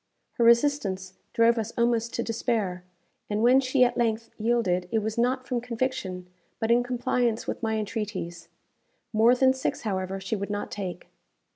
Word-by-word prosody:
Her - - +4
resistance 230 -7 +3 0.2
drove 230 0 +4
us 225 0 -4
almost 235 -1 +1
to 235 - -1
despair; 220 -6 -1 0.5
and 210 +1 0
when 250 +2 +6
she 255 0 +3
at 245 - +1
length 230 -1 0
yielded, 210 -6 +1
it 225 - +2
was 220 0 -2
not 255 +2 0
from 245 -2 -1
conviction, 230 -7 -3 0.3
but 225 +1 0
in 240 +1 +5
compliance 245 -1 0
with - - -4
my 220 -1 0
entreaties. 200 -6 -4 0.7
More 225 +3 +5
than 260 +1 +4
six, 260 - -2
however, 190 -2 -2
she 190 +3 -3
would 200 0 -4
not 205 0 -3
take. 185 -4 -5
230 Hz, 165 wpm, -27 LUFS, 200-240 Hz, 0.7 s, when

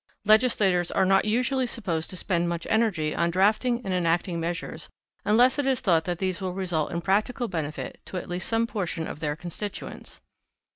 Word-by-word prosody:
Legislators 210 -5 +4
are 190 - +2
not 195 +1 +4
usually 250 +4 +1
supposed 170 -9 -2
to 185 - -6
spend 175 -2 0
much 170 -1 -3
energy 200 -9 +1
on 170 0 +1
drafting 220 +7 +2
and 190 - -1
enacting 170 0 +1
measures 170 +2 -4 0.4
unless 245 +6 +4
it 280 - 0
is 260 -3 +2
thought 165 -4 +2
that 175 -1 -2
these 185 +1 -2
will 185 -1 -2
result 180 -5 -1
in 170 - -2
practical 215 +7 +1
benefit 155 -6 -4
to 185 - -6
at - - -5
least 175 0 -4
some 225 0 +2
portion 180 -7 -3
of - - -6
their 150 -2 -1
constituents. 175 +5 -7
185 Hz, 185 wpm, -26 LUFS, 170-220 Hz, 0.4 s, Legislators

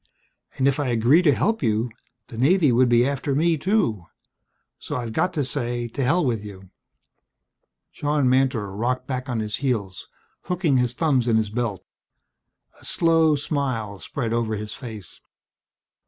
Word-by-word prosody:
And 135 - +2
if 140 +1 +1
I 145 - 0
were - - -2
to 120 - 0
agree 120 +9 +4
to 160 -5 +4
help 225 +10 0
you, 115 -1 0 0.4
the 115 - -9
Navy 155 +2 +4
would 125 +1 +4
be 120 +1 +4
after 140 0 -2
me, 165 +3 +3
too. 140 - 0 0.7
So - - -5
I've 120 -3 -4
got 180 - +1
to 145 -5 -1
say 120 -3 -3
to 135 +4 -3
hell 165 +6 +2
with 115 -5 -1
you." 95 -2 -11 1.2
John 145 -2 0
Mantor 130 -5 +1
rocked 125 +4 -1
back 130 0 -4
on 120 -2 -1
his 105 -1 -2
heels, 105 -9 -2 0.4
hooking 175 -6 +1
his 125 -1 0
thumbs 135 -6 +1
in 115 -2 +3
his 110 -2 -1
belt. 115 -4 -3 1.0
A - - -18
slow 165 -2 +3
smile 130 - -3
spread 115 +6 -3
over 115 -2 0
his 105 0 -5
face. 110 -7 -9
125 Hz, 170 wpm, -23 LUFS, 110-145 Hz, 1.2 s, agree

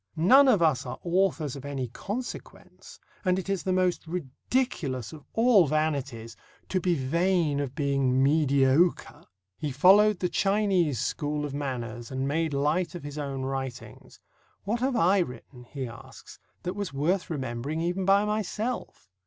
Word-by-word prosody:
None 255 - +6
of 210 -9 +4
us 155 -5 +2
are - - -5
authors 175 -5 0
of 135 - -9
any 140 -3 -4
consequence, 210 - -8 0.2
and 185 -2 +2
it 190 - -4
is 195 -2 -1
the 190 - -2
most 185 -2 0
ridiculous 155 - -3
of 155 - -11
all 225 -7 +5
vanities 140 -7 -2 0.3
to 185 - +1
be 175 0 +1
vain 165 +2 +1
of 140 -2 -4
being 135 -3 +1
mediocre." 140 +2 +2 0.4
He 150 -2 -3
followed 195 +9 +5
the 180 - -1
Chinese 195 - +1
school 150 +3 -2
of 145 - -6
manners 120 -5 -4
and 135 0 -2
made 160 +2 0
light 150 +6 0
of 175 - -7
his 145 +1 -6
own 135 -2 -4
writings. 135 -2 -6 0.4
"What 220 +4 -1
have 260 +1 0
I 195 -2 +4
written," 125 -5 -6
he 130 0 -5
asks, 115 0 -13 0.2
"that 180 - -3
was 200 -5 -4
worth 170 +8 0
remembering, 135 0 -3
even 180 +3 -1
by 195 +2 +4
myself?" 215 - -3
155 Hz, 155 wpm, -27 LUFS, 135-185 Hz, 0.4 s, None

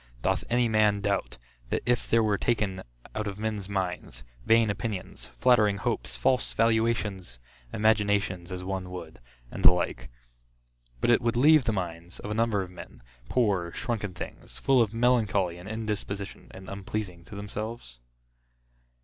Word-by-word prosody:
Doth 95 0 +1
any 120 0 +3
man 110 -2 +3
doubt, 100 -9 -1 0.3
that - - -1
if 120 0 +1
there 115 0 +4
were 105 -2 +1
taken 105 -5 0 0.3
out 105 0 -2
of 100 -1 -4
men's 105 -2 -3
minds, 90 -11 -3 0.2
vain 115 - +4
opinions, 105 -2 -5
flattering 105 -5 +3
hopes, - - -2
false 130 -1 +1
valuations, 110 - +1 0.3
imaginations 105 -4 +1
as 90 0 -5
one 95 -1 -3
would, 85 -6 -8 0.3
and - - -6
the - - +10
like, 90 -1 -2 0.9
but - - +4
it 120 - +5
would 115 0 0
leave 150 +1 +6
the - - +2
minds, 85 -3 -5
of 105 - -6
a - - 0
number 110 -3 +1
of 90 - -10
men, 90 - -12 0.3
poor 100 -8 +1
shrunken 110 -5 -2
things, - - -8
full 135 -2 +4
of 110 -3 +2
melancholy 110 -7 +2
and 90 +3 -9
indisposition, 105 -2 -4
and 95 0 -11
unpleasing 100 -2 -5
to - - -10
themselves? 105 - -6
105 Hz, 155 wpm, -28 LUFS, 95-115 Hz, 0.9 s, the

